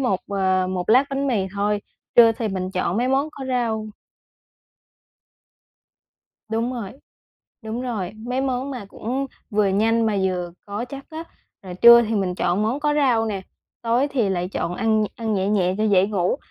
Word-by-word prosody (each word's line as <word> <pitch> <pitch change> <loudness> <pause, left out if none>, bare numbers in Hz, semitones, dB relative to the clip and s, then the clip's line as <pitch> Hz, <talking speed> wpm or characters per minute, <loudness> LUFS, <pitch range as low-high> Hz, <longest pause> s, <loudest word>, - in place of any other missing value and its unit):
một, 220 -8 0
ờ, 190 -2 +1
một 180 -1 -3
lát 255 +5 +6
bánh 275 0 -1
mì 215 -8 0
thôi, 205 +1 0 0.4
trưa 230 -1 +8
thì 225 0 -3
mình 185 -1 -3
chọn 185 0 -1
mấy 245 +3 +1
món 275 +3 +1
có 275 - -8
rau. 230 -4 -1 2.6
Đúng 230 +3 -1
rồi. 230 -6 -5 0.7
Đúng 225 +3 -4
rồi. 210 -7 -3
Mấy 245 +4 -3
món 265 0 -2
mà 245 -6 -6
cũng 255 +7 -3 0.2
vừa 210 -2 +2
nhanh 225 +3 +2
mà 210 - 0
vừa 180 -2 -1 0.2
có 205 +4 -4
chất 275 +2 -9
á. 320 +1 -6 0.4
Là 185 -2 -8
trưa 235 +5 +8
thì 225 0 -2
mình 190 -3 0
chọn 180 +3 0
món 235 +7 -1
có 295 0 +1
rau 250 -6 +2
nè, 200 -3 -3 0.4
tối 240 +4 +1
thì 250 -7 0
lại 180 -1 -1
chọn 175 -2 -3
ăn 220 +1 +1
ăn 225 -2 -2
nhẹ 190 0 0
nhẹ 185 -3 +1
cho 215 - +1
dễ 195 -2 +4
ngủ. 190 -4 0
220 Hz, 180 wpm, -22 LUFS, 195-245 Hz, 2.6 s, trưa